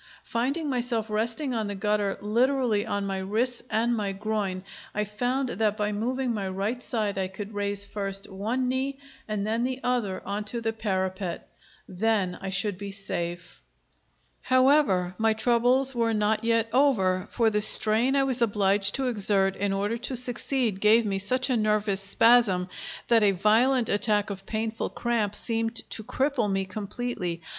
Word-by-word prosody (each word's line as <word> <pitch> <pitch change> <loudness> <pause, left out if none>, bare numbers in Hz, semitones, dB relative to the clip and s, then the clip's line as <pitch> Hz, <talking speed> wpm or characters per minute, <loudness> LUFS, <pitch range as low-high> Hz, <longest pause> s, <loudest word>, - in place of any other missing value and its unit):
Finding 275 +7 -2
myself 240 -4 -1
resting 230 +6 -2
on 220 -3 -2
the 205 - -4
gutter 205 0 -1
literally 235 0 +1
on 200 0 -2
my 195 -1 -3
wrists 225 +6 -2
and 235 +2 +1
my 205 -3 -2
groin, 200 -2 -3 0.3
I 210 - 0
found 245 +6 -2
that 210 +1 -1
by 210 -1 -1
moving 245 +4 -2
my 200 -3 -3
right 200 +6 -3
side 210 -5 -2
I 190 - -1
could 200 +3 -8
raise 200 0 -2
first 195 -1 -5
one 220 +7 -2
knee 265 +2 -2 0.3
and 210 -2 -3
then 225 +2 -1
the 255 +1 -2
other 235 -7 -1
on 205 +1 -3
to 235 +3 -4
the 225 -1 -2
parapet. 190 -4 -3 0.4
Then 195 -1 0
I 195 - -4
should 195 0 -1
be 200 -1 -6
safe. 175 -3 -6 0.8
However, 255 -9 +3
my 220 0 +3
troubles 245 +4 +2
were 230 -2 0
not 210 +1 0
yet 230 0 +1
over, 195 -10 +2
for 230 -2 +1
the 210 0 0
strain 220 +5 +7
I 275 - +3
was 260 -2 0
obliged 200 -2 +2
to 270 - 0
exert 200 -5 +2
in 200 0 -1
order 205 +4 -2
to 245 +2 -4
succeed 245 -3 0
gave 220 +2 +4
me 195 -2 -1
such 255 +7 +1
a 255 - +1
nervous 210 -3 +1
spasm 200 -2 +4 0.4
that 230 -1 +4
a 205 -2 +4
violent 225 +6 +2
attack 205 0 0
of 195 0 -8
painful 220 0 -3
cramp 225 -4 -1
seemed 225 0 +1 0.2
to 220 - -3
cripple 250 -2 -1
me 195 0 -1
completely. 195 -3 -5
215 Hz, 170 wpm, -26 LUFS, 200-240 Hz, 0.8 s, strain